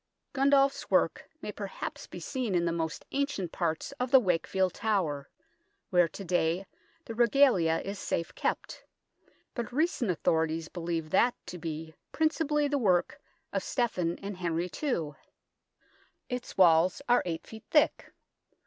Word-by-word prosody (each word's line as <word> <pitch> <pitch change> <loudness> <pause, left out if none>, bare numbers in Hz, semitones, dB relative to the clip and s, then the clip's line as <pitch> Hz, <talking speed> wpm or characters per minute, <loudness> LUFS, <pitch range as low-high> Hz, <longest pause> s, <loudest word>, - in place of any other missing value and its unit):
Gundulf's 275 0 +3
work - - +1
may - - -3
perhaps - - -6
be - - -8
seen 250 -8 -2
in 170 -1 +2
the 170 - +1
most 160 -1 -3
ancient 275 - -1
parts 165 - -2
of 250 0 -1
the 265 - +8
Wakefield 185 -2 +1
Tower, 175 -10 -1 0.6
where 175 -1 +5
to 195 - -9
day 175 +1 +1 0.4
the 230 - -6
Regalia 235 -9 +4
is 200 0 -5
safe 170 - -2
kept, - - -3 0.7
but 235 -3 -4
recent 285 - +1
authorities 160 -1 0
believe 165 -3 -3
that 240 +5 +4
to 180 - -7
be 160 -1 -5 0.2
principally 310 -2 +1
the 285 0 0
work 185 -7 +1 0.3
of - - 0
Stephen 180 -9 -1
and 200 -1 -5
Henry 175 0 -2
II. 205 - 0 1.2
Its 250 -1 -5
walls 175 +5 +5
are 245 0 +5
8 165 -2 -4
ft. 220 0 -11
thick. 300 -2 +2
185 Hz, 140 wpm, -30 LUFS, 165-250 Hz, 1.2 s, the